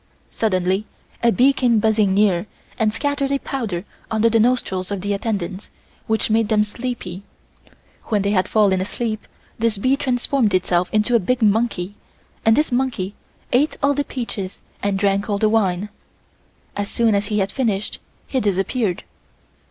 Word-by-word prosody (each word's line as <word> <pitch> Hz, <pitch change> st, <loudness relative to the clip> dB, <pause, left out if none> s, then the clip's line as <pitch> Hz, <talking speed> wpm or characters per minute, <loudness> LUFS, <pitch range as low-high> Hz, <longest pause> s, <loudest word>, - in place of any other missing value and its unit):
Suddenly 190 Hz, -1 st, 0 dB, 0.4 s
a 235 Hz, -, +4 dB
bee 265 Hz, +4 st, +4 dB
came 245 Hz, -4 st, +2 dB
buzzing 215 Hz, -3 st, +2 dB
near 200 Hz, -2 st, +3 dB, 0.3 s
and 220 Hz, -1 st, +3 dB
scattered 280 Hz, +3 st, -1 dB
a 280 Hz, -, +2 dB
powder 215 Hz, -10 st, -4 dB, 0.2 s
under 220 Hz, +1 st, +2 dB
the 225 Hz, -, +4 dB
nostrils 215 Hz, -6 st, +1 dB
of 200 Hz, -2 st, -3 dB
the 205 Hz, +1 st, -1 dB
attendants, 200 Hz, -2 st, -3 dB, 0.4 s
which 220 Hz, 0 st, +1 dB
made 225 Hz, 0 st, +3 dB
them 215 Hz, -1 st, +4 dB
sleepy. 210 Hz, -4 st, -5 dB, 0.8 s
When 210 Hz, -3 st, 0 dB
they 200 Hz, -, +1 dB
had 185 Hz, -2 st, +2 dB
fallen 200 Hz, -4 st, +3 dB
asleep, 215 Hz, +2 st, -3 dB, 0.3 s
this 225 Hz, -2 st, +1 dB
bee 255 Hz, +7 st, +2 dB
transformed 250 Hz, -5 st, +1 dB
itself 180 Hz, -1 st, +1 dB
into 215 Hz, +2 st, +2 dB
a 235 Hz, -, +6 dB
big 235 Hz, +5 st, 0 dB
monkey 205 Hz, -3 st, +1 dB, 0.5 s
and 225 Hz, 0 st, +5 dB
this 300 Hz, -1 st, +1 dB
monkey 245 Hz, -7 st, -1 dB, 0.4 s
ate 285 Hz, +5 st, +2 dB
all 285 Hz, 0 st, +4 dB
the 285 Hz, +1 st, 0 dB
peaches 230 Hz, -8 st, -5 dB, 0.2 s
and 200 Hz, -1 st, 0 dB
drank 200 Hz, +1 st, +1 dB
all 205 Hz, -, +1 dB
the 215 Hz, +1 st, +2 dB
wine. 205 Hz, -3 st, +1 dB, 0.9 s
As 205 Hz, 0 st, -2 dB
soon 230 Hz, -2 st, +2 dB
as 200 Hz, 0 st, +1 dB
he 210 Hz, -, -1 dB
had 195 Hz, -1 st, 0 dB
finished 215 Hz, -5 st, -1 dB, 0.3 s
he 265 Hz, -, -1 dB
disappeared. 200 Hz, -1 st, 0 dB
215 Hz, 160 wpm, -21 LUFS, 195-240 Hz, 0.9 s, a